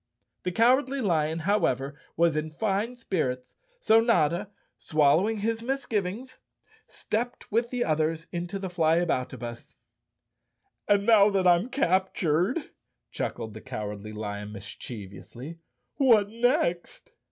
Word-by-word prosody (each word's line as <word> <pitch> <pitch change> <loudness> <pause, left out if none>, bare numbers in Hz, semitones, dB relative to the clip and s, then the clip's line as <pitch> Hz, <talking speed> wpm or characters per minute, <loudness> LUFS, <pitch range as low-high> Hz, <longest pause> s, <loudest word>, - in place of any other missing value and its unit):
The 180 - -2
Cowardly 255 +6 +3
Lion, 160 -7 +1
however, 140 -9 +1 0.2
was 165 -1 +3
in 155 +1 -2
fine 210 +7 -1
spirits, 130 - -3 0.2
so 225 - +5
Notta, 185 -4 +2 0.3
swallowing 160 +8 +2
his 225 +1 -1
misgivings, 235 -2 -3 0.5
stepped 240 +3 -4
with 230 +2 +1
the 245 -1 -1
others 160 +1 0
into 175 +3 -4
the 195 -1 -4
Flyaboutabus. 155 -9 -1 1.1
"And 200 0 +3
now 210 -3 +6
that 195 -2 +1
I'm 180 +6 +4
cap¬ 190 -8 +1
tured," 180 - 0 0.4
chuckled 110 -1 -4
the 110 - -9
Cowardly 105 -4 -6
Lion 105 -1 -5
mischievously, 110 - -9 0.4
"what 225 -8 +4
next?" 230 - 0
180 Hz, 115 wpm, -27 LUFS, 150-225 Hz, 1.1 s, now